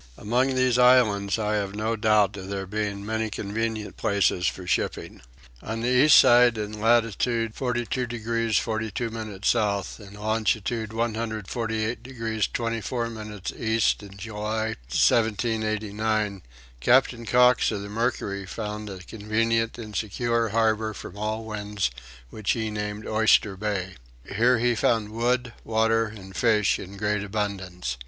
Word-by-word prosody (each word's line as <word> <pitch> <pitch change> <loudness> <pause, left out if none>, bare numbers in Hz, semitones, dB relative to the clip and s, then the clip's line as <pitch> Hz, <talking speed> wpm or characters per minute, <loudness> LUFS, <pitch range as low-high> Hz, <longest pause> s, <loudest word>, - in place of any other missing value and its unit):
Among 125 +5 +1
these 130 -1 +2
islands 115 -6 +4
I 105 -1 0
have 100 -1 -3
no 110 +2 -1
doubt 105 -2 +3
of 95 -1 -7
there 100 -1 -3
being 100 0 -3
many 110 +1 -1
convenient 110 +1 -3
places 100 -4 +1
for 90 - -3
shipping. 90 - -2 0.4
On 110 +2 -4
the 120 - 0
east 130 +4 +7
side 120 -1 +6
in 105 0 -5
latitude 115 0 +2
42 125 0 -2
degrees 115 -1 -1
42 110 +1 -2
minutes 110 -3 -3
south 100 -2 0
and 100 -1 -12
longitude 110 +1 -1
148 110 0 -2
degrees 115 -4 -2
24 115 0 -2
minutes 105 -3 -6
east 110 -1 +1
in 100 -1 -12
July, 110 +1 -3 0.2
1789, 110 - +1 0.4
Captain 120 - +3
Cox 125 +2 +5
of 105 -3 -3
the - - -6
Mercury 105 -3 -2
found 105 +1 -5
a 95 -2 -8
convenient 115 +2 -1
and 110 -3 -8
secure 115 +2 0
harbour 110 0 +1
from - - -9
all 110 +2 -3
winds 105 - -2 0.4
which 110 -3 -1
he 110 -2 -2
named 105 0 -4
Oyster 110 -2 +3
Bay. 95 -2 -3 0.4
Here 120 +3 +4
he 120 +1 +2
found 110 -2 +1
wood, 120 +2 0
water, 115 0 +2
and 95 -3 -11
fish 105 -4 +2
in 100 +1 -9
great 105 0 0
abundance. 95 - -3
110 Hz, 140 wpm, -25 LUFS, 105-115 Hz, 0.4 s, east